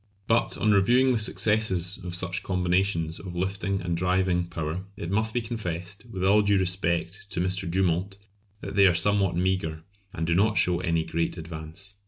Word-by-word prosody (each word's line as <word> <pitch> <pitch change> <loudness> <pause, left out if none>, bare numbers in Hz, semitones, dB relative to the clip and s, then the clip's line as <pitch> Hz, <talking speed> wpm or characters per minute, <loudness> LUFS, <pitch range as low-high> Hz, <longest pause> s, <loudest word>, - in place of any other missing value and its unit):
But 115 +1 +1
on 110 - +2
reviewing 120 +6 +4
the 115 - +1
successes 100 -3 +1
of 90 -1 -4
such 90 0 -1
combinations 90 -2 0
of 90 -3 -8
lifting 95 +2 -2
and 85 -1 -1
driving 90 0 +1
power 85 +1 -4
it 85 - -5
must 110 +2 +1
be 120 - -1
confessed, 100 -2 -5
with 95 -4 -4
all 105 +2 +5
due 100 -1 +3
respect 90 +1 -1
to 100 - -4
M. 90 - +1 0.2
Dumont, 95 +2 0 0.4
that - - -6
they 100 -1 +7
are 90 - +3
somewhat 100 0 +2
meagre, 90 -4 -1 0.3
and 80 - -3
do 85 - +1
not 105 +5 +2
show 90 -1 +3
any 85 -3 0
great 85 +2 -2
advance. 85 +4 -8
95 Hz, 180 wpm, -26 LUFS, 85-100 Hz, 0.4 s, they